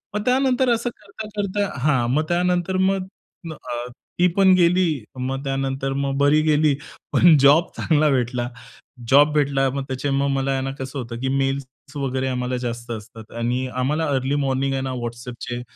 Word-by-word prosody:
मग 210 - 0
त्यानंतर 260 0 +2
असं 235 +1 -1
करता-करता 205 -1 -4
हां 130 -4 +2
मग 155 +3 +2
त्यानंतर 180 +1 +1
मग 190 -1 -1 0.4
म 165 - -5
अ, 120 -4 -6 0.3
ती 180 - +5
पण 195 -1 +6
गेली 180 +1 +4 0.3
मग 135 +2 -3
त्यानंतर 135 0 -2
मग 135 0 -1
बरी 145 +2 +4
गेली 150 -1 +3 0.4
पण 170 -3 +6
जॉब 145 +5 +5
चांगला 155 -2 +2
भेटला, 125 -2 0 0.6
जॉब 145 +2 +6
भेटला. 140 -2 +2
मग 135 +1 -3
त्याचे 130 +1 -3
मग 140 - +1
मला 135 0 0
आहे 135 -1 0
ना 135 0 -3
कसं 135 +1 -5
होतं, 115 -2 -6
की 130 - -1
मेल्स 135 0 0 0.3
वगैरे 130 -1 -1
आम्हाला 125 -1 -2
जास्त 120 -1 -5
असतात. 110 0 -9
आणि 120 +2 -1
आम्हाला 135 +6 -1
अर्ली 135 +2 0
मॉर्निंग 135 0 0
आहे 135 - -1
ना 130 - -3
WhatsAppचे 120 +1 -6
135 Hz, 170 wpm, -22 LUFS, 130-165 Hz, 0.6 s, पण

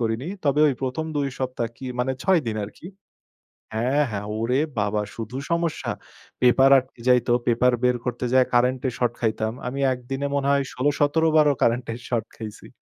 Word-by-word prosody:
করিনি। 115 +6 -1 0.2
তবে 145 +1 +2
ওই 135 - 0
১ম 145 +5 -2
২ 140 -1 0
সপ্তাহ 130 -2 -2
কি 130 - -8
মানে 130 +2 0
৬ 190 -4 +4
দিন 110 - -2
আরকি 105 +10 -12 0.9
হ্যাঁ, 130 +6 +2
হ্যাঁ, 105 -1 -4
ওরে 125 +4 +1 0.2
বাবা 105 +1 0
শুধু 115 +2 -6
সমস্যা! 170 -1 -1 0.5
পেপার 135 +2 +5
আটকে 130 -2 -6
যাইত, 125 -1 +4 0.2
পেপার 125 +1 +3
বের 125 0 +3
করতে 125 0 -3
যাই 130 -1 +5
কারেন্টের 125 +1 +2
শর্ট 120 -1 0
খাইতাম। 110 -1 0 0.2
আমি 135 +2 -4
১ 125 - -4
দিনে 135 +1 -1
মনে 140 0 0
হয় 140 -1 +3
১৬-১৭ 145 +4 +2
বারও 150 -2 +5
কারেন্টের 120 0 +1
শর্ট 115 -3 -1
খাইছি। 110 -2 -9
125 Hz, 175 wpm, -24 LUFS, 115-140 Hz, 0.9 s, পেপার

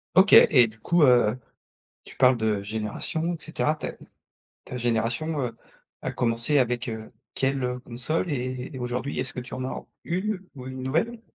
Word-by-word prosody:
OK. 190 +3 +6
Et 125 -5 +8
du 110 0 -13
coup, 170 +9 +2
heu, 125 -3 +5 0.7
tu - - -11
parles 130 -1 +5
de 110 -3 0
génération 110 +11 -2
et - - -8
cetera. 155 -1 0
Ta - - -5 0.7
ta 125 - -6
génération, 120 +6 0
heu, 115 -3 -3 0.4
a - - -3
commencé 115 +4 +1
avec, 120 -2 +1
heu, 110 -1 -6 0.2
quelle, 135 0 0
heu, 125 0 -2
console 130 +8 -2
et 130 -1 -3
et 130 - -6
aujourd'hui 125 +3 -3
est-ce 130 - -2
que 125 - -4
tu 125 - -10
en 130 0 -3
as 130 - -5 0.2
1 185 +3 -1 0.2
ou 130 -1 -8
1 130 0 -6
nouvelle? 170 - -1
125 Hz, 180 wpm, -26 LUFS, 120-150 Hz, 0.7 s, Et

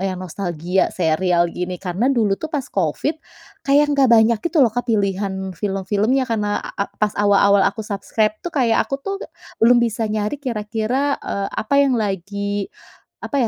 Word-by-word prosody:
yang 190 -1 -2
nostalgia 180 0 -1
serial 175 +1 +1
gini 180 +1 -5
karena 195 +8 -1
dulu 220 -7 +2
tuh 315 +9 -7
pas 290 -5 -2
Covid 190 - -1 0.5
kayak 290 +1 +3
nggak 275 -2 +4
banyak 225 0 +5
gitu 340 -1 -1
loh 245 -6 +5
Kak 245 -1 -2
pilihan 195 -2 -1
film-filmnya 205 +7 0
karena 210 -3 -1
a 200 - -5
pas 210 -1 0
awal-awal 200 -1 +4
aku 200 +3 0
subscribe 215 +1 -1
tuh 350 - -4
kayak 245 -7 +2
aku 275 - -4
tuh 390 +8 -4 0.5
belum 240 +1 +6
bisa 230 -1 0
nyari 210 +4 -1
kira-kira, 235 +4 -1
eee, 200 0 -3
apa 215 +6 -3
yang 275 -2 +4
lagi 200 -1 -2 0.5
apa - - -6
210 Hz, 160 wpm, -20 LUFS, 195-245 Hz, 0.5 s, belum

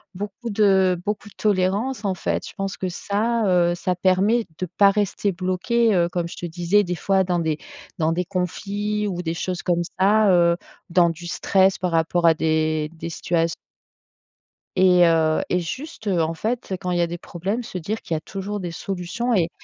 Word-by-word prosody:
beaucoup 205 +5 -6
de 190 -3 +3
beaucoup 210 0 -3
de - - -21
tolérance 205 +4 0
en 195 - +1
fait, - - -2
je - - -10
pense 195 -1 -3
que 185 - -2
ça, 215 +5 -1
heu, 175 -1 +3
ça 180 +1 -1
permet 190 +6 +2
de 185 - -2
pas 195 +3 +4
rester 205 0 0
bloqué, 190 +6 +1
heu, 175 -2 +2
comme 175 -1 -2
je - - -9
te - - -6
disais 175 +5 +2
des 180 -2 -3
fois 190 +2 +2
dans 180 -1 0
des 160 -2 -1 0.4
dans 160 0 +2
des 180 +2 -1
conflits 205 +3 -2
ou 180 -3 -3
des 165 -1 -3
choses 180 +1 -3
comme 175 -1 +1 0.2
ça, 205 +1 +4
heu, 170 -1 +4 0.3
dans 170 -1 +4
du 170 +1 -9
stress 190 +2 +2
par 180 -1 -2
rapport 165 +1 +1
à 165 - +7
des 155 -1 0
des 165 +1 -6
situat 165 0 0 1.3
et 180 -1 +6
heu, 160 -1 +3
et 180 - +2
juste, 255 - -6
en 165 -4 +1
fait, 220 +4 -3
quand 180 - -3
il 175 - +1
y - - +2
a 170 - +2
des 170 +1 -5
problèmes, 195 +9 -3
se 200 - -7
dire 205 +6 -4
qu'il 165 - -3
y - - 0
a - - -3
toujours 200 +3 -5
des 175 -2 -4
solutions, 195 +8 -3
et 170 -3 +2
185 Hz, 200 wpm, -23 LUFS, 170-205 Hz, 1.3 s, à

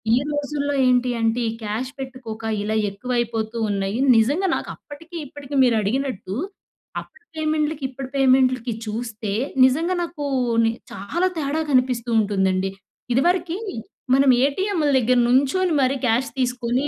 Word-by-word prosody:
ఈ - - +3
రోజుల్లో 290 -1 -2
ఏంటి 250 0 +3
అంటే, 225 +1 +1
ఈ - - -2
క్యాష్ 220 +5 -3
పెట్టుకోక, 255 -4 -7 0.2
ఇలా 215 +1 -1
ఎక్కువైపోతూ 230 +1 -2
ఉన్నాయి. 195 +1 -1 0.2
నిజంగా 285 - +2
నాకు - - -5
అప్పటికి, 325 +4 -13
ఇప్పటికి 285 0 -8
మీరు 245 -2 +4
అడిగినట్టు 210 -3 -2 0.7
అప్పటి 470 -2 -19
పేమెంట్‌లుకి, 310 -1 -1
ఇప్పటి 265 0 -7
పేమెంట్‌లుకి 255 -3 +3
చూస్తే, 220 -1 -4 0.3
నిజంగా 325 +8 +1
నాకూ, 335 -4 -4 0.4
ని 225 - +3 0.2
చాలా 345 - -1
తేడా 300 +1 -1
కనిపిస్తూ 250 -2 +2
ఉంటుందండి. 190 -2 +1 0.4
ఇదివరకి, 345 +6 +1 0.6
మనం 275 0 +4 0.2
ఏటీఎంలు 330 +1 0
దగ్గర 250 +1 +3
నుంచొని 280 +8 +2
మరి 265 +1 +2
క్యాష్ 235 +3 +1
తీసుకొని 250 +1 0
255 Hz, 130 wpm, -22 LUFS, 225-290 Hz, 0.7 s, మీరు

